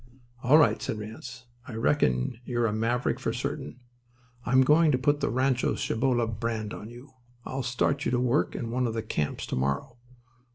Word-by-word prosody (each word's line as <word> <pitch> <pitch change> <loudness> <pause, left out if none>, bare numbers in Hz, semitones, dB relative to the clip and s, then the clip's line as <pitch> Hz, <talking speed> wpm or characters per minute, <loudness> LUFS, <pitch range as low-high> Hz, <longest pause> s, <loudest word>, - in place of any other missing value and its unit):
"All 135 +5 +6
right," 115 -9 +4
said - - -3
Ranse. 115 +4 -8 0.2
"I 120 - -7
reckon 110 - +1
you're 120 -1 0
a 110 - 0
maverick 115 +3 0
for - - -1
certain. 125 - -5 0.7
I'm 130 +1 +5
going 155 +3 +5
to 130 - +3
put 145 +3 +1
the - - 0
Rancho 130 +1 +1
Cibolo 120 0 +1
brand 110 -1 -3
on 105 - -8
you. 120 +4 -13 0.3
I'll 135 +1 -3
start 130 +3 0
you - - 0
to 125 - +1
work 125 +4 +1
in 115 -1 -4
one 125 +1 0
of 115 - -3
the 110 - -2
camps 75 -9 -2
to - - -3
morrow." 70 - -2
120 Hz, 190 wpm, -27 LUFS, 110-130 Hz, 0.7 s, All